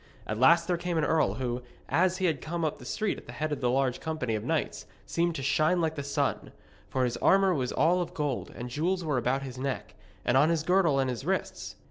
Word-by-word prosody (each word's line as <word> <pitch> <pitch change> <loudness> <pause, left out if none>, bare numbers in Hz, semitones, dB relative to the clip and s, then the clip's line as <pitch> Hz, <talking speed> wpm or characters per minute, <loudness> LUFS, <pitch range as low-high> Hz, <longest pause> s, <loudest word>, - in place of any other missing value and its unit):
At 110 +1 -3
last 170 +6 +6
there 175 -2 +1
came 175 0 -2
an 155 - +2
earl 150 -11 +2
who, 125 0 -2 0.3
as 185 +1 +2
he 180 -4 +2
came 160 +4 -3
up 155 - -2
the - - -11
street 215 -2 -2
at - - -18
the 120 - -8
head 155 +4 -3
of 145 -3 -3
a - - +3
large 130 0 +1
company 155 -8 -2
of 110 - -2
knights, - - -2 0.2
seemed 170 0 0
to 135 - -4
shine 155 +6 +2
like 160 -2 0
the 145 - -4
sun. 140 0 -2 0.4
For 130 - 0
his 120 -1 -1
armour 195 -1 +4
was 130 -6 -1
all 175 +3 +3
of 175 - -5
gold, 145 -5 -2
and 120 - -5
jewels 170 +8 -1
were 145 -5 +1
about 130 +3 0
his 130 -2 -7
neck, 135 0 -3 0.3
and 120 - +3
on 145 +4 +5
his 165 -2 +1
girdle 180 -4 +3
and 135 -1 +2
his 125 -2 -3
wrists. - - -3
150 Hz, 240 wpm, -28 LUFS, 130-170 Hz, 0.4 s, last